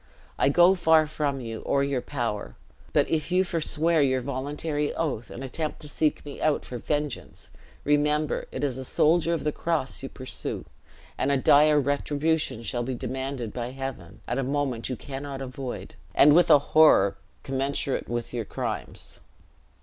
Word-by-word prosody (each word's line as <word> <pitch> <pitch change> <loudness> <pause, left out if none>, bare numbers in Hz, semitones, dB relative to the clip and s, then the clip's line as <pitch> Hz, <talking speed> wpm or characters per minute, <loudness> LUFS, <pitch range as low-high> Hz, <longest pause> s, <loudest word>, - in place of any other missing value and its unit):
I - - +4
go 175 +5 +6
far 160 -4 +4
from 145 -3 -2
you, 115 -2 -5
or 140 0 +1
your 140 -2 -1
power; 110 - -4 0.4
but - - +3
if 160 +1 -1
you 185 +1 +4
forswear 165 -2 +1
your 130 -2 +2
voluntary 145 +3 -2
oath, 135 -8 -2
and 130 - -7
attempt 150 +4 -3
to 150 - -9
seek 150 +1 0
me 145 - -8
out 155 -1 +1
for 125 - -6
vengeance, 150 +2 -4 0.3
remember 150 +1 +1
it - - -4
is 130 -3 -1
a - - -4
soldier 165 +5 +2
of 165 - -1
the 150 - +1
cross 160 -4 -2
you 135 - -6
pursue, 130 -1 -5 0.5
and 140 - +1
a 140 - +3
dire 150 +3 +5
retribution 145 -1 0
shall 120 +1 -2
be 125 +1 -3
demanded 130 -2 -4
by 120 -1 -4
Heaven, 130 -10 -7
at 120 +3 -1
a - - 0
moment 135 -3 -1
you 130 - -2
cannot 135 +2 -6
avoid, 130 -1 -6 0.2
and 145 - +7
with 175 +2 +5
a - - +9 0.2
horror 100 -11 +6 0.3
commensurate 135 0 -1
with 120 0 -3
your 120 -2 -2
crimes." - - -5
140 Hz, 170 wpm, -26 LUFS, 130-150 Hz, 0.5 s, a